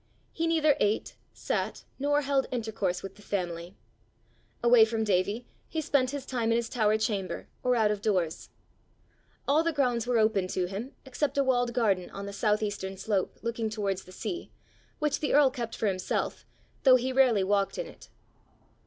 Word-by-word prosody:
He 330 0 -1
neither 310 -3 +4
ate, 210 +1 0 0.2
sat, - - -3 0.2
nor 290 +1 +2
held 275 -1 +1
intercourse 220 -7 -2
with 195 - -8
the - - -15
family. 175 -3 -4 0.9
Away 240 -1 +7
from 220 0 0
Davie, 205 +3 0 0.2
he 320 - -2
spent 280 -5 +2
his 280 -1 -5
time 240 -4 -1
in - - +3
his 235 0 -1
tower 215 -3 +2
chamber, 205 -4 -2
or 250 0 +2
out 220 -3 +3
of 205 -1 -3
doors. 180 -7 -1 1.0
All 295 +3 +4
the 335 - +1
grounds 245 -6 0
were 245 -1 +2
open 215 -4 +2
to 185 0 -1
him 205 +9 -6
except 275 +2 -2
a 280 - +4
walled 245 -2 +1
garden 200 -7 +1
on 200 0 -7
the 200 - -6
south 210 +1 +1
eastern 195 -2 -4
slope, 200 -2 -1
looking 230 -1 -2
towards 200 -3 -2
the 185 - -13
sea, 350 - -5 0.5
which 300 -1 0
the 295 - +1
earl 285 -2 +6
kept 240 -4 -5
for - - -2
himself, 185 -3 -2 0.3
though 260 -2 +7
he 255 +1 0
rarely 250 -7 +4
walked 200 0 +1
in - - -2
it. - - -14
225 Hz, 180 wpm, -29 LUFS, 200-260 Hz, 1.0 s, Away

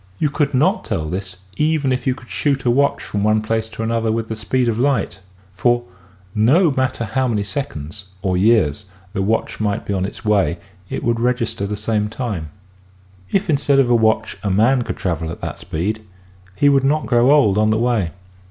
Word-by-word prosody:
You 150 +4 0
could 145 -2 0
not 185 - +2
tell 80 - -2
this 90 +3 -5 0.2
even 150 -3 +1
if 130 +1 -1
you 130 - +2
could 120 - -15
shoot 140 -3 0
a 120 - +4
watch 140 +3 +2
from 100 -1 -3
one 110 0 +2
place 110 0 -1
to 110 0 -5
the 115 - -1
other 115 -1 +1
with 115 0 -2
the 110 - -2
speed 125 +3 0
of 115 -1 0
light, 125 -9 0 0.3
for 120 +5 +2 0.5
nek 140 - +4
matter 130 -3 0
how 130 +3 0
many 105 -4 0
seconds 100 - -5
— - - -30
or 95 -2 +1
years 105 -3 +2
— 95 0 -28
the 95 - -1
watch 110 +4 -1
might 105 -2 -1
be 100 - -2
on 95 -1 0
its 105 - -10
way 100 -5 +2 0.3
it - - -4
would 115 0 +1
register 120 -4 0
the 105 - -3
same 105 0 -1
time. 105 - -4 0.8
If 195 +1 0
instead 140 -3 +2
of 130 -3 +3
a - - +6
watch 110 -1 +1
a 105 - -1
man 115 +7 +3
could - - -4
travel 80 -3 -2
at 85 - -7
that - - -5
speed 105 +7 -3 0.5
he 145 - +3
would 140 -1 +4
not 150 +3 +1
grow 120 +1 +3
old 130 -9 +4
on 110 0 +3
the 110 - +2
way. 115 -6 +1
115 Hz, 215 wpm, -20 LUFS, 100-130 Hz, 0.8 s, a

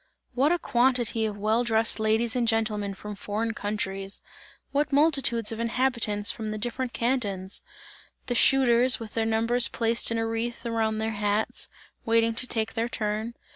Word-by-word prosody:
What 270 +5 +2
a 350 - +3
quantity 240 -5 +1
of 205 -1 -6
well 215 +4 +1
dressed 225 -1 +2
ladies 220 +2 +1
and 240 -2 +1
gentlemen 215 -3 0
from 210 +2 -8
foreign 215 +3 -3
countries! 195 -2 -3 0.5
What 290 +1 0
multitudes 275 -7 +3
of 225 - -5
inhabitants 230 -3 +1
from 220 -1 -5
the 215 - -4
different 245 +3 -3
cantons! 205 -7 -2 0.6
The 245 - -2
shooters, 250 0 +4
with 225 -2 -9
their 225 -1 0
numbers 230 +2 +2
placed 230 0 0
in 230 - -1
a 225 - 0
wreath 230 +1 -3
around 225 -2 0
their 220 +1 -1
hats, 210 0 -1 0.3
waiting 230 0 +2
to 250 +2 +1
take 225 -2 -2
their 230 +1 -2
turn. 215 +1 -3
225 Hz, 165 wpm, -26 LUFS, 215-240 Hz, 0.6 s, shooters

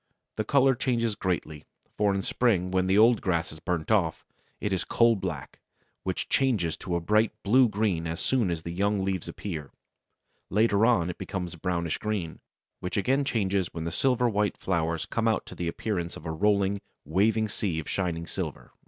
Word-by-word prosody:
"The 110 - +1
colour 135 +3 +4
changes 120 -3 0
greatly, 85 -6 -3 0.3
for 105 -2 +2
in 95 - -1
spring 95 -7 +1
when 95 0 +1
the 95 +2 +3
old 115 +2 +6
grass 85 -3 0
is 80 - -10
burnt 90 +1 -2
off, 90 -7 +1 0.3
it 105 - -1
is 95 - 0
coal 115 -1 +4
black, 85 -10 -5 0.4
which - - -3
changes 105 - +1
to 90 -2 -3
a - - +1
bright 105 +5 +2
blue 125 +4 +5
green 100 -6 0
as 80 0 -3
soon 125 -7 +1
as 85 -2 -3
the 85 - -5
young 100 +1 +1
leaves 95 -3 -2
appear; 80 -8 -6 0.8
later 105 +1 +3
on 90 -8 +3
it - - -13
becomes 90 -2 -4
brownish 85 -1 -2
green, 100 -7 -3 0.4
which 90 - -4
again 130 +7 +2
changes 100 -9 0
when 80 - -3
the 85 - -3
silver 125 +6 +2
white 105 -2 0
flowers 85 -3 -1
come 115 0 -1
out 110 - +1
to - - -10
the 85 - -4
appearance 85 -1 -3
of 75 - -12
a 80 - -2
rolling, 100 +3 +1 0.2
waving 110 +8 +2
sea 100 -5 -2
of 80 - -4
shining 85 -3 -2
silver." - - -5
95 Hz, 190 wpm, -27 LUFS, 85-110 Hz, 0.8 s, old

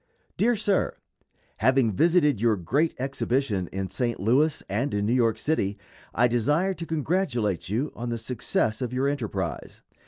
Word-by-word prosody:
_ - - -55
DEAR 235 +3 +2
SIR: 205 -2 0 0.6
Having 130 +1 +3
visited 150 - +3
your 115 -2 +3
great 140 - 0
exhibition 130 -7 -1
in 95 -1 -4
St. 120 +3 -1
Louis 135 - +2
and 110 +6 -1
in 100 0 0
New 115 - +1
York 115 -3 +2
City, 110 -8 -1 0.3
I 120 +2 +3
desire 145 - +1
to 165 -2 -7
congratulate 130 - -1
you 125 +9 -1
on 120 0 -4
the 115 - -2
success 115 -1 -1
of 125 -1 -3
your 130 +2 +1
enterprise. 105 - -4
125 Hz, 160 wpm, -26 LUFS, 105-150 Hz, 0.6 s, Having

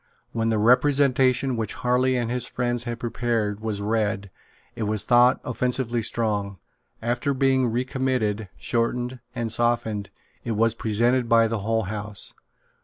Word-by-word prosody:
When 115 -1 0
the 110 - +1
Representation 130 +2 +3
which 110 -3 -3
Harley 125 +1 +1
and 120 -1 -1
his 125 -1 0
friends 120 -1 -2
had 120 -1 -4
prepared 115 -3 -1
was 110 -2 -3
read, 105 -2 -1 0.4
it - - -7
was 105 -2 0
thought 120 +1 +5
offensively 125 -1 -1
strong. 105 -3 -1 0.5
After 125 +4 0
being 130 -1 +3
recommitted, 120 -4 -1
shortened 125 +2 -1 0.2
and 115 -1 -2
softened, 110 -4 0 0.3
it 115 - -2
was 115 +1 +2
presented 115 +3 +1
by 115 -1 +5
the 115 -1 -2
whole 110 +2 0
House. 105 0 -4
115 Hz, 140 wpm, -24 LUFS, 110-125 Hz, 0.5 s, thought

